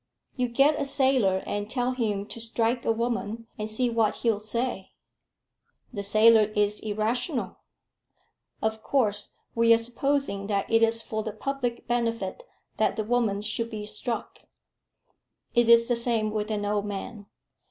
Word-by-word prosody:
"You 250 -1 0
get 280 +5 +3
a - - 0
sailor, 260 -9 +2
and 205 +1 -3
tell 250 +1 0
him 215 -5 -1
to 230 - -8
strike 230 +1 -1
a - - +3
woman, 230 -1 -2
and 215 0 -3
see 245 +3 0
what 230 -3 +1
he'll 225 -3 0
say." 215 -1 -3 1.0
"The 205 - -3
sailor 215 +2 +5
is 210 0 +1
irrational. 230 +6 -2 1.1
Of 220 0 -1
course, 210 -6 0 0.2
we 230 0 +4
are - - +2
supposing 240 -3 -1
that 200 -2 0
it 225 0 +4
is 225 0 +2
for 220 0 -3
the 215 -1 -5
public 245 +1 -3
benefit 230 - -1 0.4
that - - +2
the 215 - -1
woman 215 -3 0
should 230 +2 -3
be 215 -2 -6
struck. 215 +3 -5 1.1
It 240 -1 +3
is 230 0 +7
the 245 - +2
same 230 -2 +1
with 215 0 -2
an 210 -1 -2
old 205 0 -1
man. 205 +1 -6
225 Hz, 155 wpm, -27 LUFS, 210-240 Hz, 1.1 s, is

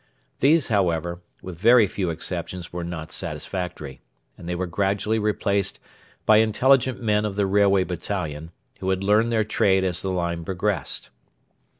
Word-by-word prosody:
These, 150 +2 +3
however, 85 -4 0 0.2
with 90 -3 -8
very 115 +2 +6
few 95 -2 -3
exceptions 85 +1 -5
were 90 0 -4
not 85 -2 -6
satisfactory, 90 -7 -5 0.3
and 85 - -9
they 90 - -1
were 95 +1 -2
gradually 100 +4 0
replaced 100 -2 0 0.5
by 110 - +6
intelligent 125 +4 +3
men 105 -3 +1
of 105 -2 -3
the 100 -1 +1
'Railway 100 -1 +3
Battalion,' 85 -3 -4 0.3
who 95 - -2
had 95 0 0
learned 105 +4 +3
their 110 -1 +2
trade 95 -2 +2
as 90 -2 -1
the 95 - -3
line 85 -2 -2
progressed. 95 +3 -2
95 Hz, 155 wpm, -24 LUFS, 90-105 Hz, 0.5 s, very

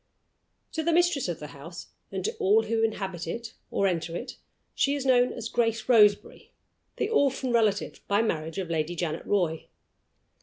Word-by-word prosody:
To 320 - -2
the 335 +2 +1
mistress 345 - +2
of 170 -2 -3
the 150 - -8
house, 165 +5 -10 0.2
and - - -3
to 445 - -1
all 425 +1 +4
who 225 0 0
inhabit 195 -6 -2
it 230 +6 -5 0.2
or 200 - 0
enter 170 -3 -1
it, 250 - -7 0.4
she 280 +1 +1
is 280 -2 -4
known 250 -1 +4
as 235 -2 -5
Grace 225 -1 0
Roseberry, 210 -5 +3 0.5
the - - 0
orphan 275 - +1
relative 215 -4 +1
by 205 +2 +2
marriage 160 -6 -2
of 180 -3 -3
Lady 160 +1 -1
Janet 170 -2 -3
Roy. 175 -6 0
220 Hz, 175 wpm, -27 LUFS, 175-255 Hz, 0.5 s, all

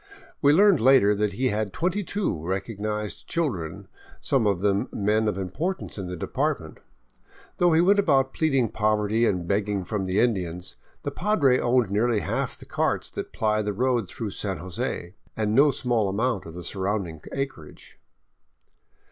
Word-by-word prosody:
We 145 - +6
learned 195 +4 +5
later 125 -4 +5
that 105 -1 0
he 130 +6 0
had 105 -2 -1
twenty 185 +4 -1
two 180 - -2
recognized 105 +3 -3
chil 165 -4 0
dren, 80 -6 -7 0.3
some 130 -6 +1
of 100 -3 +1
them 100 0 +1
men 110 +2 +1
of 105 -3 -1
importance 150 - -3
in 95 -3 -5
the 90 - -5
department. - - -2 0.8
Though 175 -1 +4
he 160 - +5
went 200 +3 +4
about 135 -8 +3
pleading 135 -7 +1
poverty 110 +2 +1
and 90 -3 -1
begging 100 -1 0
from 95 0 -2
the 95 +3 +1
Indians, 90 -7 -1 0.3
the - - -2
padre 155 -10 +2
owned 120 -4 +2
nearly 110 +1 +2
half - - -2
the - - -12
carts - - -1
that - - -6
ply 110 -1 +1
the 105 -1 -2
road 120 -2 0
through 110 0 -5
San 95 -2 -3
Jose, 90 -1 -4 0.2
and 105 -1 0
no 140 +5 +6
small 120 -7 0
amount 110 -1 -1
of 80 - -10
the 90 - -7
surrounding 95 -4 -3
acreage. 135 - -6
105 Hz, 165 wpm, -25 LUFS, 95-130 Hz, 0.8 s, We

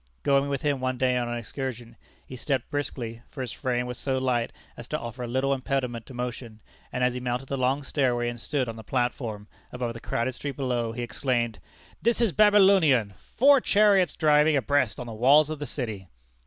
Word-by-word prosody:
Going 140 0 +2
with 140 -2 -2
him 145 -2 +1
one 130 0 -2
day 125 0 +2
on 120 -1 -1
an 120 - -2
excursion, 120 0 -6 0.3
he 130 - -9
stepped 130 -1 -2
briskly 120 -5 -4
(for 135 - -7
his 125 -3 -3
frame 125 -2 -2
was 125 0 -6
so 135 -1 -1
light 125 -3 0 0.2
as 120 - -9
to 150 - -2
offer 120 -1 -6
little 130 +3 +1
impediment 130 -3 -2
to 130 - -10
motion), 120 -2 -5 0.3
and 125 - -1
as 125 0 +2
he 125 - -4
mounted 125 +1 -3
the 140 - -2
long 130 +3 +1
stairway, 125 -4 0
and 120 0 -4
stood 130 +1 -2
on 115 -1 -6
the 110 - -9
platform 115 -3 -2 0.2
above 125 -2 -3
the 115 - -8
crowded 120 +3 -2
street 140 +2 -5
below, 125 -4 -1
he 120 +1 -4
exclaimed, 120 -1 -1 0.4
"This 235 0 +1
is 230 -5 +3
Babylonian! 190 - +5
Four 280 +1 +4
chariots 200 -5 +3
driving 150 -1 +4
abreast 130 -4 +1
on 125 - -5
the 115 - -7
walls 140 +7 +5
of 155 - -5
the 145 - -4
city!" 110 -8 -5
130 Hz, 205 wpm, -26 LUFS, 120-140 Hz, 0.4 s, Babylonian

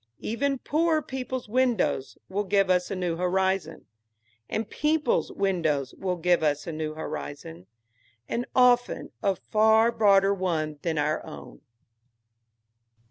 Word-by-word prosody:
Even 275 +5 -1
poorer 315 +3 +1
people's 260 -2 -5
windows 235 - 0
will 200 +2 -2
give 195 -1 +2
us 180 -1 +1
a - - -3
new 175 -3 -2
horizon, 185 -2 -1 0.6
and 220 -1 -2
people's 310 - 0
windows 160 -9 0
will 185 -1 -2
give 175 0 +2
us 145 -1 0
a 170 - -4
new 155 -1 -4
horizon, 95 - -7 0.6
and 240 +1 -3
often 245 -1 +3
a 195 -1 +1
far 220 +4 +3
broader 200 -3 +4
one 160 -6 -2
than 165 -2 -2
our 150 +1 0
own. - - -11
190 Hz, 130 wpm, -26 LUFS, 160-235 Hz, 0.6 s, broader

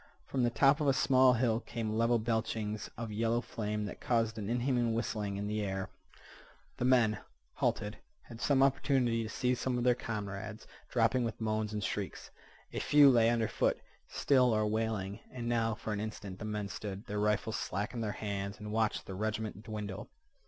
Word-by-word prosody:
From 135 - -1
the 120 - +3
top 135 +5 +4
of 150 - +1
a 135 - +5
small 130 -1 +5
hill 115 -2 +2
came 110 -3 -4
level 115 +1 +3
belchings 110 -1 -2
of 115 -1 -4
yellow 115 +2 +1
flame 105 -3 -3
that 100 - -7
caused 115 -2 +1
an 105 0 -4
inhuman 120 -1 +1
whistling 105 -3 -2
in 100 - -3
the 105 +1 -1
air. 95 -1 -3 0.9
The - - -1
men, 120 -4 +4 0.3
halted, 105 +1 -1 0.2
had 115 0 -11
opportunity 135 -3 +3
to 110 - -4
see 125 +3 0
some 125 0 -1
of 120 - -1
their 125 0 +5
comrades 110 -2 -5 0.2
dropping 120 +1 +2
with 115 -2 -3
moans 110 -1 -1
and 105 -1 -3
shrieks. - - -4 0.4
A - - -2
few 145 -2 +7
lay 115 -2 +5
under 115 -2 +2
foot, - - +1 0.3
still 125 -4 +3
or 110 0 +2
wailing. 105 -2 -1
And 120 -2 -5
now 115 -2 +1
for 110 - -4
an 100 - -2
instant 105 -3 -6
the - - -5
men 105 -1 -2
stood, 100 +2 -6
their 105 -1 -3
rifles 105 +1 +1
slack 100 +6 -3
in 120 - -3
their 105 -2 -2
hands, 100 -1 -4
and 105 0 -6
watched 110 0 0
the 95 - -7
regiment 110 +1 -3
dwindle. 105 -3 -6
110 Hz, 190 wpm, -32 LUFS, 105-120 Hz, 0.9 s, few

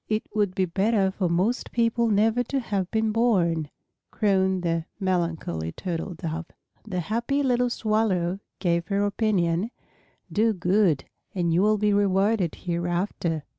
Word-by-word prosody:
"It 215 +1 0
would 205 -3 0
be 190 - +2
better 195 +2 +1
for 190 -2 -1
most 185 +8 0
people 235 0 +2
never 220 +3 +3
to 275 +3 -1
have 200 -7 -2
been 220 -1 +1
born," 175 -9 +2 0.4
crooned 190 -3 +1
the 165 -1 0
melancholy 165 - -1
Turtle 180 0 -4
Dove. 165 0 -4 0.4
The 180 -4 -2
happy 235 - -1
little 250 -2 +2
Swallow 210 -6 0 0.2
gave 170 -2 0
her 200 0 +1
opinion, 200 -2 +1 0.6
"Do 220 +1 +2
good 180 -4 +2 0.3
and 170 -3 +1
you 175 - +3
will 215 +1 +3
be 210 0 +2
rewarded 200 -2 +2
hereafter." 175 -2 -2
195 Hz, 140 wpm, -25 LUFS, 170-215 Hz, 0.6 s, never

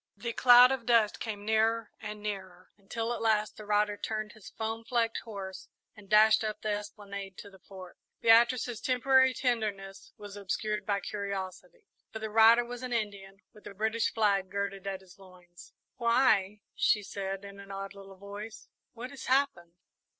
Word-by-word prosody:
The 235 +3 -4
cloud 245 +1 +8
of 255 -3 -3
dust 230 -3 +3
came 205 -3 -5
nearer 220 0 +1
and 210 0 -8
nearer, 185 -3 -6
until 225 +4 -4
at - - -5
last 215 -1 +1
the 215 - -11
rider 210 0 +1
turned 215 0 -4
his 220 -2 -13
foam 225 +1 -4
flecked 230 -1 0
horse 195 -4 -8 0.3
and 205 -2 -16
dashed 215 +1 +6
up 215 -1 -3
the 215 - -1
esplanade 200 -2 -6
to 200 - -10
the 190 - -17
Fort. 185 -1 -13 0.2
Beatrice's 235 +1 +4
temporary 260 +1 +4
tenderness 210 -6 -3
was 205 -1 -10
obscured 210 +1 -3
by 200 -1 0
curiosity, 190 -3 -6 0.3
for - - -6
the 220 -1 -5
rider 225 +2 +6
was 245 0 -7
an 250 -1 -4
Indian, 200 -3 -4
with 210 - -17
the 200 - -10
British 220 +3 0
flag 200 -4 +1
girded 200 0 -4
at 195 -1 -4
his 190 0 -18
loins. 180 -2 -16 0.3
"Why," 220 -4 +2
she 210 - +2
said, 195 0 -5
in 200 0 -11
an 200 0 -12
odd 195 0 -6
little 195 -1 -13
voice, 205 +3 -9 0.2
"what 245 +3 -8
has 280 - -9
happened!" 255 -11 0
210 Hz, 170 wpm, -30 LUFS, 195-225 Hz, 0.3 s, cloud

